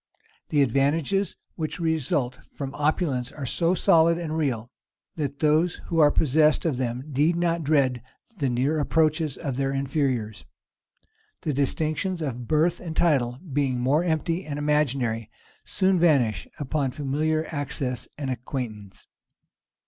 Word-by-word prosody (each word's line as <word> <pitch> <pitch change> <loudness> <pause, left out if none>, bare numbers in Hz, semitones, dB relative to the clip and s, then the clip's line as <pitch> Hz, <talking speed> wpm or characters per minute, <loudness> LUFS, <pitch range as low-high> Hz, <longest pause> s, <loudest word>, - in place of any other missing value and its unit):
The 145 -2 +4
advantages 145 - +1 0.2
which 160 +1 -4
result 155 -6 0 0.2
from 135 -1 -5
opulence 145 -4 0
are 145 - -6
so 170 +7 +1
solid 165 -1 +4
and 160 -2 -3
real, 125 -7 -1 0.4
that 145 -3 -3
those 155 +3 +2
who 165 - -3
are 150 -2 +7
possessed 155 +2 +3
of 150 -6 0
them 125 0 -2
need 150 +3 +1
not 170 -1 0
dread 135 -5 +2 0.4
the 140 - +1
near 135 +6 +1
approaches 155 -1 +1
of 140 -5 -4
their 135 0 0
inferiors. 135 - -1 1.0
The 150 - -1
distinctions 155 +6 0
of 125 -4 -4
birth 160 +3 +2
and 165 -2 -6
title, 130 -8 +2 0.2
being 135 -3 +1
more 140 +7 +2
empty 165 +1 -1
and 145 -3 -5
imaginary, 135 -7 0 0.4
soon 190 -1 +1
vanish 140 -10 +2
upon 145 -1 -1
familiar 155 +2 0
access 140 -4 -3
and 140 -3 -3
acquaintance. 115 -6 -6
145 Hz, 135 wpm, -25 LUFS, 130-160 Hz, 1.0 s, are